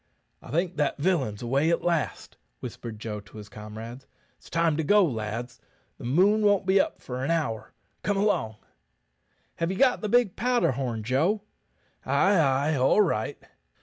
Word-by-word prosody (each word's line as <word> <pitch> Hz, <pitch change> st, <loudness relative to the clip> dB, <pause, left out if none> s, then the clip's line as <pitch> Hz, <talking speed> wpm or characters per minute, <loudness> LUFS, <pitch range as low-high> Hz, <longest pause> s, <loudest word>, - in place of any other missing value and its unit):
"I -, -, -13 dB
think 170 Hz, +5 st, -1 dB
that 145 Hz, -2 st, 0 dB
villain's 140 Hz, -, 0 dB
away 135 Hz, +6 st, +1 dB
at 170 Hz, -, +1 dB
last," 170 Hz, -3 st, -1 dB, 0.2 s
whispered 115 Hz, -2 st, -7 dB
Joe 105 Hz, -1 st, -5 dB
to 105 Hz, +1 st, -14 dB
his 105 Hz, -1 st, -10 dB
comrades. 110 Hz, +5 st, -9 dB, 0.3 s
"It's -, -, -17 dB
time 165 Hz, -2 st, +2 dB
to 160 Hz, -, 0 dB
go, 205 Hz, +5 st, +5 dB
lads; 115 Hz, -2 st, -4 dB, 0.4 s
the -, -, -10 dB
moon 195 Hz, -, +3 dB
won't 205 Hz, -2 st, +3 dB
be 190 Hz, +1 st, +5 dB
up -, -, -4 dB
for 125 Hz, 0 st, -5 dB
an 135 Hz, -, -2 dB
hour. 150 Hz, -10 st, -1 dB, 0.3 s
Come 205 Hz, -1 st, 0 dB
along." 195 Hz, -, +1 dB, 1.0 s
"Have 165 Hz, 0 st, -1 dB
ye 190 Hz, -, -3 dB
got 255 Hz, 0 st, +3 dB
the 215 Hz, -, -2 dB
big 240 Hz, -4 st, +3 dB
powder 245 Hz, -, +2 dB
horn, 120 Hz, -4 st, -3 dB
Joe?" 160 Hz, -, +1 dB, 0.6 s
"Ay, 200 Hz, +1 st, +3 dB
ay, 140 Hz, +1 st, +2 dB
all 135 Hz, +11 st, +4 dB
right." 110 Hz, -, -2 dB
150 Hz, 170 wpm, -26 LUFS, 115-190 Hz, 1.0 s, go